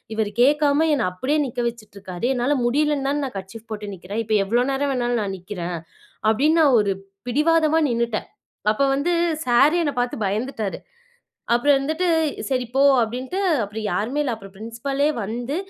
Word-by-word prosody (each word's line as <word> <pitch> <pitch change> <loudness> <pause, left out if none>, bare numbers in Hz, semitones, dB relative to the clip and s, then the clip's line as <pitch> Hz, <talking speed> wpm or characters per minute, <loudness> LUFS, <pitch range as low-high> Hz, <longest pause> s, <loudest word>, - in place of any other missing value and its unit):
"இவர் 215 -1 0
கேக்காம 295 +3 +4
என்னை 245 - 0
அப்படியே 260 +12 -1
நிக்க 245 -2 -6
வச்சுட்ருக்காரு, 200 -4 -8
என்னால 250 +4 +1
முடியலன்னு 285 +2 +1
தான 290 +1 -1
நான் 255 - -7
கர்ச்சீப் 205 +4 -9
போட்டு 210 -1 -5
நிக்கிறேன், 190 +5 -4
இப்ப 215 0 +1
எவ்வளோ 240 +5 +2
நேரம் 275 +1 0
வேணாலும் 240 -2 0
நான் 195 -1 -3
நிக்கிறேன்." 180 -2 -5 0.5
அப்படின்னு 300 +9 +3
நான் 275 -5 +5
ஒரு 200 -1 0 0.4
பிடிவாதமா 315 +3 +3
நின்னுட்டேன். 235 -2 -1 0.4
அப்ப 220 - -4
வந்து, 290 +6 0 0.3
சாரே 275 +7 +5
என்ன 290 -3 -1
பாத்து 245 0 -2
பயந்துட்டாரு. 215 0 -3 0.7
அப்புறம் 280 +4 +4
வந்துட்டு, 315 +6 -1 0.4
"சரி, 255 -2 0
போ!" 270 - +2 0.2
அப்படின்ட்டு, 255 - -3 0.2
அப்புறம் 210 +2 -6
யாருமே 220 +11 -1
இல்ல. 270 - -1
அப்புறம் 195 -3 -13
ப்ரின்சிபலே 230 +7 -2
வந்து, 235 +7 -4
245 Hz, 155 wpm, -22 LUFS, 215-285 Hz, 0.7 s, நான்